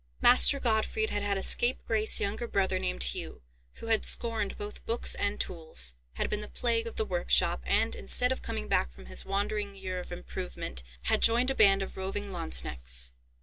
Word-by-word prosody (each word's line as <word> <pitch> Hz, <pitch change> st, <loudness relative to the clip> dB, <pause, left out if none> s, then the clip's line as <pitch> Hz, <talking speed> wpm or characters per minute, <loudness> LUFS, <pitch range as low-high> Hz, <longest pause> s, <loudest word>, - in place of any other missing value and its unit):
Master 60 Hz, +1 st, +7 dB
Gottfried 235 Hz, -, -1 dB
had 205 Hz, -, -2 dB
had 200 Hz, -1 st, -1 dB
a 195 Hz, -, -4 dB
scapegrace 225 Hz, -3 st, +4 dB
younger 215 Hz, +4 st, -3 dB
brother 195 Hz, -3 st, -1 dB
named -, -, -2 dB
Hugh, -, -, -3 dB, 0.3 s
who -, -, -11 dB
had 225 Hz, -1 st, +1 dB
scorned 225 Hz, -4 st, 0 dB
both 205 Hz, 0 st, -9 dB
books 230 Hz, +1 st, +2 dB
and 205 Hz, +1 st, -3 dB
tools, 160 Hz, -, +3 dB, 0.2 s
had -, -, -3 dB
been 210 Hz, -, -3 dB
the 210 Hz, -, -7 dB
plague 230 Hz, -1 st, -1 dB
of 230 Hz, -, -8 dB
the 220 Hz, -, -2 dB
workshop, 175 Hz, -, +1 dB
and, -, -, +1 dB
instead 65 Hz, -1 st, +2 dB
of -, -, -3 dB
coming 70 Hz, +3 st, -5 dB
back 60 Hz, -, 0 dB
from 60 Hz, +1 st, -15 dB
his 60 Hz, 0 st, -2 dB
wandering 200 Hz, 0 st, -3 dB
year 185 Hz, -1 st, -6 dB
of 180 Hz, -, -10 dB
improvement, 60 Hz, +1 st, -6 dB, 0.2 s
had -, -, +1 dB
joined 240 Hz, +3 st, +4 dB
a -, -, -1 dB
band 195 Hz, -3 st, +4 dB
of -, -, -9 dB
roving 195 Hz, +1 st, -5 dB
Lanzknechts. 60 Hz, -, -2 dB
195 Hz, 190 wpm, -28 LUFS, -, 0.3 s, Master